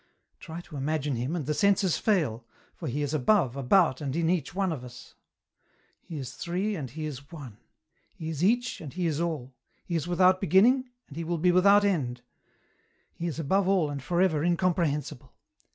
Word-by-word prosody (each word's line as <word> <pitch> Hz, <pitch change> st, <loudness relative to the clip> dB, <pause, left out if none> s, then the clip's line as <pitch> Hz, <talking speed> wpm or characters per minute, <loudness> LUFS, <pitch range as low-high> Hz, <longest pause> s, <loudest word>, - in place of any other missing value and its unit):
Try 165 Hz, 0 st, -8 dB
to 155 Hz, -4 st, -10 dB
imagine 145 Hz, 0 st, -1 dB
Him, 125 Hz, +8 st, -2 dB
and 160 Hz, -5 st, -3 dB
the 150 Hz, -, 0 dB
senses 195 Hz, 0 st, +2 dB
fail, 155 Hz, -, +1 dB, 0.3 s
for -, -, -7 dB
He 145 Hz, +4 st, -2 dB
is 145 Hz, +1 st, -3 dB
above, 150 Hz, -, +2 dB
about, 140 Hz, +1 st, +3 dB
and 135 Hz, -2 st, -3 dB
in 165 Hz, 0 st, +1 dB
each 175 Hz, -2 st, -2 dB
one 195 Hz, -2 st, 0 dB
of 140 Hz, -6 st, -5 dB
us. 125 Hz, -1 st, -12 dB, 0.9 s
He 165 Hz, -, -8 dB
is 130 Hz, -4 st, -6 dB
three 190 Hz, +5 st, -2 dB
and 140 Hz, -7 st, -5 dB
He 155 Hz, +5 st, -6 dB
is 140 Hz, -1 st, -8 dB
one; 135 Hz, -10 st, -9 dB, 0.6 s
He 165 Hz, -5 st, -7 dB
is 160 Hz, 0 st, -3 dB
each 245 Hz, +5 st, +1 dB
and 150 Hz, -4 st, -7 dB
He 180 Hz, -1 st, -2 dB
is 160 Hz, -1 st, 0 dB
all; 150 Hz, -7 st, -3 dB, 0.3 s
He 170 Hz, -, -3 dB
is 165 Hz, 0 st, -1 dB
without 185 Hz, +1 st, +3 dB
beginning, 245 Hz, +7 st, +4 dB, 0.2 s
and 145 Hz, -, -12 dB
He 165 Hz, -, -3 dB
will 170 Hz, +1 st, -2 dB
be 180 Hz, +3 st, +3 dB
without 200 Hz, +3 st, +5 dB
end; 125 Hz, -11 st, -1 dB, 0.9 s
He 170 Hz, -, -4 dB
is 160 Hz, -, -4 dB
above 185 Hz, +5 st, +1 dB
all 185 Hz, -6 st, +2 dB
and 140 Hz, -1 st, -5 dB
for 170 Hz, +6 st, -1 dB
ever 160 Hz, -5 st, +1 dB
incomprehensible. 170 Hz, -6 st, -1 dB
165 Hz, 195 wpm, -28 LUFS, 140-185 Hz, 0.9 s, without